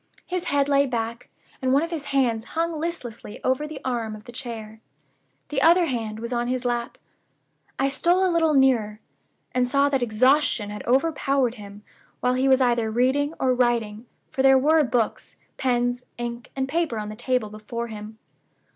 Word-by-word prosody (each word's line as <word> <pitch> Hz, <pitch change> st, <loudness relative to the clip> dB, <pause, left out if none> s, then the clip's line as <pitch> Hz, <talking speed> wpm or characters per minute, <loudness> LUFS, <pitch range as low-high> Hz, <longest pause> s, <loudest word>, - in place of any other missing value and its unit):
His 365 Hz, -1 st, -3 dB
head 285 Hz, -4 st, +1 dB
lay 280 Hz, 0 st, +3 dB
back, 235 Hz, -1 st, -4 dB, 0.3 s
and 260 Hz, -1 st, +1 dB
one 280 Hz, +3 st, +4 dB
of 335 Hz, -, -4 dB
his 310 Hz, -4 st, -4 dB
hands 245 Hz, -6 st, +1 dB
hung 335 Hz, 0 st, +1 dB
listlessly 305 Hz, -10 st, -5 dB
over 260 Hz, +4 st, 0 dB
the 300 Hz, -2 st, -7 dB
arm 230 Hz, -4 st, -2 dB
of 210 Hz, -, -12 dB
the 240 Hz, -, -11 dB
chair. 225 Hz, -3 st, -7 dB, 0.7 s
The 275 Hz, -3 st, -1 dB
other 345 Hz, +3 st, +6 dB
hand 225 Hz, -6 st, -3 dB
was 235 Hz, +2 st, -4 dB
on 240 Hz, 0 st, 0 dB
his 255 Hz, 0 st, -2 dB
lap. 240 Hz, -1 st, -2 dB, 0.8 s
I 270 Hz, -, +2 dB
stole 350 Hz, +7 st, +2 dB
a 365 Hz, -, +1 dB
little 325 Hz, -2 st, +3 dB
nearer, 235 Hz, -6 st, +3 dB, 0.5 s
and 250 Hz, 0 st, +2 dB
saw 280 Hz, +2 st, +3 dB
that 270 Hz, -2 st, 0 dB
exhaustion 245 Hz, -1 st, +2 dB
had 210 Hz, -, -7 dB
overpowered 275 Hz, -2 st, +2 dB
him 205 Hz, -2 st, -11 dB, 0.4 s
while 250 Hz, +1 st, +1 dB
he 260 Hz, +1 st, +1 dB
was 265 Hz, 0 st, +5 dB
either 240 Hz, -3 st, +2 dB
reading 265 Hz, +7 st, +1 dB
or 255 Hz, -1 st, +2 dB
writing, 235 Hz, -2 st, 0 dB, 0.2 s
for 265 Hz, -, -1 dB
there 270 Hz, 0 st, +6 dB
were 305 Hz, +4 st, +4 dB
books, 235 Hz, -3 st, -1 dB, 0.2 s
pens, 245 Hz, -1 st, 0 dB
ink, 240 Hz, 0 st, -5 dB
and 265 Hz, -1 st, -1 dB
paper 310 Hz, -4 st, -1 dB
on 210 Hz, -1 st, -4 dB
the 215 Hz, -, -7 dB
table 245 Hz, -2 st, -1 dB
before 215 Hz, +3 st, -5 dB
him. 215 Hz, -1 st, -9 dB
250 Hz, 180 wpm, -24 LUFS, 230-280 Hz, 0.8 s, other